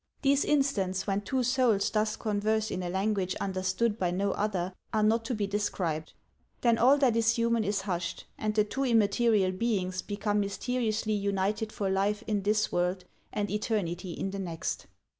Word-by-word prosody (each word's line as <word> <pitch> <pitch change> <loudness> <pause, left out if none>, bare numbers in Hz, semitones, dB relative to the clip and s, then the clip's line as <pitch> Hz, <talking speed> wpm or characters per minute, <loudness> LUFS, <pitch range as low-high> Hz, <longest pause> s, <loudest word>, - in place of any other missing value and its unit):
These 275 0 +3
instants 210 -11 +1
when 200 0 0
two 255 +5 -1
souls 245 -5 +2
thus 215 0 +1
converse 215 +1 0
in 185 - -2
a 175 - -3
language 190 0 0
un 195 - -2
derstood 190 +4 0
by 180 - +1
no 195 +3 0
other 190 -3 -1 0.2
are 215 -1 +1
not 225 +2 +3
to 245 - -1
be 210 -1 -1
described; 185 -6 -2 0.5
then 235 -2 +3
all 265 +5 +6
that 260 -5 +3
is 225 0 +3
human 230 -1 +2
is 200 -1 0
hushed, 175 -3 -3
and 215 0 -2
the 210 - +4
two 270 +6 -3
immaterial 220 -4 +3
beings 185 -3 -1
become 205 0 -1
mysteriously 220 +1 -1
united 200 +2 -1
for 200 - -2
life 205 +3 0
in 210 -2 0
this 210 +2 +1
world 180 +1 0 0.3
and 205 -2 -2
eternity 190 -5 -2
in 195 - -3
the 195 - -5
next. 170 -4 -4
210 Hz, 180 wpm, -29 LUFS, 190-225 Hz, 0.5 s, all